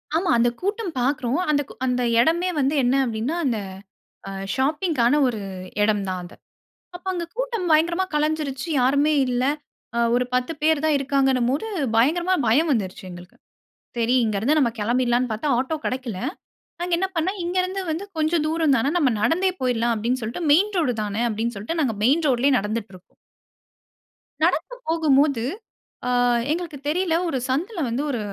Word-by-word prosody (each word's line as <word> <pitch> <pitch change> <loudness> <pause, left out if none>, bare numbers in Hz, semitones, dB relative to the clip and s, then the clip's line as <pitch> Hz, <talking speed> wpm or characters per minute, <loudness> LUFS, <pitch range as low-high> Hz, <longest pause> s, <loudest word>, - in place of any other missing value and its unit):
ஆமாம். 335 -1 +2
அந்தக் 240 +1 +1
கூட்டம் 400 -1 -2
பார்க்கறோம். 260 +2 0
அந் 295 -1 +3 0.3
அந்த 250 -1 0 0.2
இடமே 335 +8 +2
வந்து 275 +2 +1
என்ன 250 +2 +2
அப்படின்னா 235 +6 -2
அந்த 235 -5 0 1.0
ஷாப்பிங்க்கான 295 -2 +1
ஒரு 230 -4 -2 0.4
இடம் 210 -1 +2
தான் 185 -1 -2
அது. 175 - -12 0.6
அப்போ 355 +2 -10
அங்க 345 -2 -3
கூட்டம் 480 -7 -2
பயங்கரமா 340 +4 +3
கலஞ்சிடுச்சு 300 -1 -1
யாருமே 285 +4 +3
இல்லை 250 +2 +1 0.7
ஒரு 250 +1 +1
10 250 +3 0
பேர் 310 -1 +3
தான் 310 -2 +3
இருக்காங்கன்னும் 270 -3 +1
போது 300 +11 -2 0.3
பயங்கரமாக 340 +8 +2
பயம் 295 +9 +3
வந்துருச்சு 210 -3 -2
எங்களுக்கு. 175 +1 -12 0.6
சரி 235 +1 +1
இங்கேந்து 220 +7 +1
நம்ம 255 -6 +3
கிளம்பிடலாம்னு 240 +2 +1
பார்த்தா 250 +7 -1
ஆட்டோ 265 +5 -1
கிடைக்கல. 255 -6 -3 0.6
நாங்க 350 0 -3
என்ன 380 - +1
பண்ணோம் 370 +5 -1
இங்கேருந்து 370 +2 -1
வந்து 325 +5 -3
கொஞ்சம் 315 +1 +1
தூரம் 315 -2 +2
தானே 245 +3 +1
நம்ம 295 -7 +3
நடந்தே 365 - +2
போயிடலாம் 240 -2 +1
அப்படின்னு 235 +4 -1
சொல்லிட்டு 235 +10 -3
மெயின் 400 +8 +4
ரோடு 315 -8 +2
தானே 210 +2 -2
அப்படின்னு 230 +2 -2
சொல்லிட்டு 220 +12 -4
நாங்க 245 -6 0
மெயின் 295 +7 +3
ரோட்லேயே 260 +1 +3
நடந்துட்டு 210 0 -3
இருக்கோம். 185 0 -18 1.3
நடந்து - - +1
போகும்போது 290 -6 +3 0.6
ஆ - - 0 0.4
எங்களுக்கு 330 -3 -3
தெரியவில்லை 330 +2 +1
ஒரு 275 - -1
சந்துல 345 - -1
வந்து 235 +4 -1
ஒரு 250 -5 -1
275 Hz, 155 wpm, -23 LUFS, 240-330 Hz, 1.3 s, மெயின்